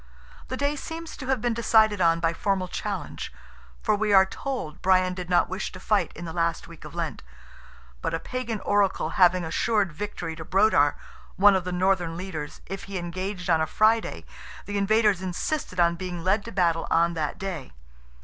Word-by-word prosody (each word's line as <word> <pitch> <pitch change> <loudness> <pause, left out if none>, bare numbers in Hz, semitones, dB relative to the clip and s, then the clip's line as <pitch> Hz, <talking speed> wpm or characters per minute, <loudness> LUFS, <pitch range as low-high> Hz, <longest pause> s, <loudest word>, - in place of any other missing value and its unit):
The 260 - -4
day 285 +2 0
seems 325 +3 -7
to 260 - -7
have 265 -4 +1
been 240 -1 +1
decided 220 -3 +3
on 165 -1 +4
by 165 0 +1
formal 190 +1 -1
challenge, - - -5 0.5
for 215 - +2
we 210 0 0
are 190 -1 +8
told 190 - -5
Brian 185 -1 +3
did 180 -1 -6
not 175 - +4
wish 190 +1 -4
to 185 - -8
fight 210 +2 +1
in 175 - -7
the 165 - -6
last 170 -1 -1
week 165 -2 -13
of - - -10
Lent, - - -3 0.8
but - - -1
a - - -2
Pagan 245 -1 -4
oracle 200 -5 +1
having 180 0 +5
assured 200 +3 +1
victory 175 -2 -5
to 160 - -7
Brodar, 185 -6 +3 0.4
one 200 +1 +6
of 185 -2 -1
the 180 - -3
northern 180 -2 +1
leaders, 165 -5 -6
if 195 - -6
he 195 -1 -5
engaged 185 +2 -4
on 165 -2 +3
a 160 - +1
Friday, 220 +4 +2 0.4
the 205 0 -2
invaders 210 -1 +3
insisted 185 - -3
on 170 0 +4
being 180 -2 -5
led 200 +3 +2
to 230 - -7
battle 170 -4 +1
on 170 +1 +3
that 155 -3 -2
day. 180 -8 -5
185 Hz, 190 wpm, -26 LUFS, 170-210 Hz, 0.8 s, are